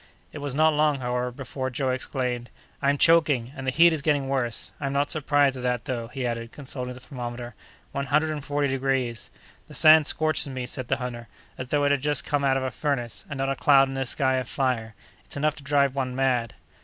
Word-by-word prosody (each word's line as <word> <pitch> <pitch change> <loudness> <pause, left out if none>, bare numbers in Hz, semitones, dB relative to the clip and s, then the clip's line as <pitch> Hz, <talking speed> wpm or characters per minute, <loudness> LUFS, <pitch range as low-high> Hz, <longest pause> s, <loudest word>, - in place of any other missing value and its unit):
It 150 - -6
was 140 -2 -4
not 155 +1 +4
long, 150 -1 +2
however, 125 0 -1
before 130 +1 -5
Joe 130 0 -1
exclaimed: 125 -2 -3 0.3
"I'm 140 +1 +2
choking, 145 -7 +3
and 130 -2 -6
the - - +2
heat 170 +4 +6
is 155 - -2
getting 145 -2 +1
worse! 130 -4 -2
I'm 140 -1 -2
not 140 +1 0
surprised 145 -2 +2
at - - -6
that, 125 -1 -1
though," 120 -5 -3
he 130 +1 -5
added, 115 -1 -3
consulting 125 -3 -6
the - - -11
thermometer; 120 -2 -7 0.4
"one 140 0 -3
hundred 155 +2 +2
and 150 -2 -4
forty 145 0 0
degrees!" 130 -3 -1 0.4
"The - - -11
sand 155 -1 +7
scorches 155 -1 +1
me," 130 -2 -4
said 125 0 -5
the 130 - +1
hunter, 120 -3 -6 0.3
"as 130 - -6
though 145 +2 +1
it 145 - +3
had 145 -2 +1
just 145 -2 +2
come 145 -1 0
out 135 -1 +3
of 135 - -2
a 130 - -2
furnace; 120 -4 -2
and 145 - -5
not 135 0 0
a - - -1
cloud 135 -1 +5
in - - -5
this 135 -2 -2
sky 130 -2 +1
of 130 -2 -3
fire. 120 -5 -1 0.3
It's - - -9
enough 150 +1 +1
to 150 - -10
drive 140 -2 +2
one 130 -2 -2
mad!" 125 -3 0
135 Hz, 230 wpm, -25 LUFS, 125-145 Hz, 0.4 s, sand